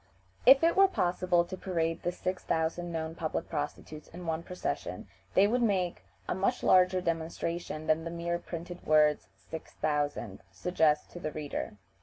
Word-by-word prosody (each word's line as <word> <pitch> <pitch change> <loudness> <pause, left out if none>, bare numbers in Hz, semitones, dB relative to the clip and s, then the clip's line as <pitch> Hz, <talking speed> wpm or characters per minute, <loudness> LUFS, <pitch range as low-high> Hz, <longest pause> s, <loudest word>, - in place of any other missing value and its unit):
If 270 +3 +9
it 335 - +4
were 390 0 +7
possible 180 - +1
to 185 +2 -6
parade 165 -3 -1
the 175 - -1
six 185 +1 -3
thousand 165 +2 -1
known 160 -1 -3
public 160 -1 -3
prostitutes 150 +1 -5
in 175 +1 -10
one 160 0 -1
procession, 180 +1 -4 0.3
they 195 - +7
would 240 +4 +2
make 190 -6 +1 0.3
a - - 0
much 200 +7 0
larger 185 0 +5
demonstration 165 -1 -3
than 155 +1 +2
the 165 - -4
mere 170 0 -2
printed 175 +1 -7
words 150 -1 +4
"six 150 +12 -9
thousand" 145 -9 -2
suggest 150 - +1
to 175 - -8
the 155 -3 -3
reader. 145 -8 -5
170 Hz, 165 wpm, -30 LUFS, 155-180 Hz, 0.3 s, If